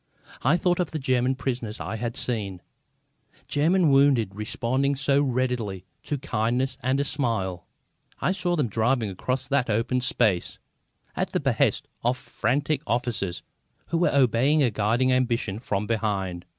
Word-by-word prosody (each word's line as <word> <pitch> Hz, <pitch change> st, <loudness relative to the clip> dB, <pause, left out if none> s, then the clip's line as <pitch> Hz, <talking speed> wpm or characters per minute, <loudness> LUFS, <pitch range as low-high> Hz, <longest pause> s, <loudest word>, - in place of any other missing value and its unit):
I 150 Hz, +7 st, +3 dB
thought 175 Hz, 0 st, +1 dB
of 175 Hz, -4 st, 0 dB
German 130 Hz, -1 st, +1 dB
prisoners 120 Hz, -4 st, -3 dB
I 110 Hz, -, -4 dB
had 120 Hz, +1 st, -4 dB
seen, 100 Hz, -7 st, -3 dB, 0.8 s
German 165 Hz, +2 st, +3 dB
wounded 135 Hz, -7 st, +4 dB
responding 125 Hz, +6 st, -1 dB
so 140 Hz, +1 st, +2 dB
readily 125 Hz, -8 st, -1 dB, 0.2 s
to 145 Hz, -, -2 dB
kindness 125 Hz, 0 st, -1 dB
and 130 Hz, +2 st, +1 dB
a -, -, +2 dB
smile. 100 Hz, -, -1 dB, 0.5 s
I -, -, +1 dB
saw 180 Hz, -2 st, 0 dB
them 150 Hz, -7 st, +1 dB
driven 115 Hz, 0 st, +1 dB
across 130 Hz, +7 st, -2 dB
that 135 Hz, -3 st, +1 dB
open 115 Hz, +4 st, +1 dB
space, 110 Hz, -7 st, +1 dB, 0.6 s
at -, -, -2 dB
the -, -, +2 dB
behest -, -, +1 dB, 0.2 s
of 125 Hz, +2 st, +1 dB
frantic 140 Hz, +5 st, -1 dB
officers 115 Hz, -8 st, -2 dB, 0.5 s
who 165 Hz, -, 0 dB
were 175 Hz, -, +3 dB
obeying 140 Hz, +3 st, +3 dB
a 120 Hz, -, +2 dB
guiding 115 Hz, +5 st, +1 dB
ambition 115 Hz, -5 st, 0 dB
from 105 Hz, -3 st, -2 dB
behind. 100 Hz, -6 st, -2 dB
125 Hz, 145 wpm, -25 LUFS, 110-140 Hz, 0.8 s, wounded